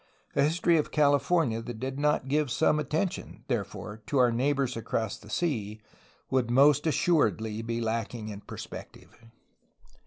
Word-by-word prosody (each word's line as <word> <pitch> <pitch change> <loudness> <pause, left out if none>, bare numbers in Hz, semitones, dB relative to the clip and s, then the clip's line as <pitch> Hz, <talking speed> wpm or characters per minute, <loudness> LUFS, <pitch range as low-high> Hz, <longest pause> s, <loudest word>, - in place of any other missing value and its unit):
A - - +3
history 165 +3 +3
of 150 - 0
California 145 -4 +2
that 115 -1 -7
did 130 +2 -4
not 150 -2 +1
give 150 0 +1
some 150 +5 +2
attention, 155 +6 -3
therefore, 105 +2 -4
to 140 - 0
our 125 -2 +5
neighbors 135 +1 0
across 110 -2 -2
the 105 - -15
sea 110 -8 -2 0.5
would 130 -3 +1
most 140 +4 +5
assuredly 110 - +1
be 115 +1 -3
lacking 115 -1 -3
in 100 -1 -7
perspective. - - -10
130 Hz, 145 wpm, -28 LUFS, 115-150 Hz, 0.5 s, our